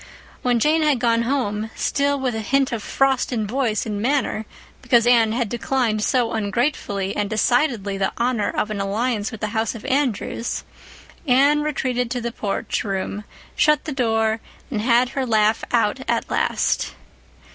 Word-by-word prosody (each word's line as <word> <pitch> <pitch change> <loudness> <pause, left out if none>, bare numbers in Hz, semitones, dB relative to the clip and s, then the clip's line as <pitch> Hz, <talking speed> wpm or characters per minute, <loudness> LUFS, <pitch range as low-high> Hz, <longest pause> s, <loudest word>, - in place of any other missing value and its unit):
When 245 -1 +2
Jane 310 +6 +3
had 300 -3 +3
gone 235 -1 +2
home—still 255 +3 -1
with 260 -2 -1
a 220 - -3
hint 270 +5 +1
of 230 -3 -2
frost 270 +4 +1
in 225 -4 -1
voice 225 -1 -1
and 210 -2 -3
manner 245 -4 0 0.3
because 240 -3 +3
Anne 235 -3 +4
had 235 0 0
declined 235 -1 0
so 245 -3 +1
ungratefully 205 -2 -1
and 205 -1 -1
decidedly 220 -3 +1
the 195 - +1
honor 235 -3 0
of 210 - -2
an 205 -2 -2
alliance 215 +2 -1
with 225 - -9
the 215 - -1
House 225 +1 -1
of 225 - -9
Andrews—Anne 275 - -1
retreated 255 -5 -1
to 245 - -2
the 235 0 -3
porch 205 -3 -2
room, 200 +1 -3 0.3
shut 300 -2 +3
the 310 - -3
door, 225 -4 +1 0.3
and 215 -5 -1
had 240 +2 +3
her 270 0 -2
laugh 220 -2 +2
out 230 +1 +2
at - - 0
last. - - 0
235 Hz, 160 wpm, -22 LUFS, 215-260 Hz, 0.3 s, Anne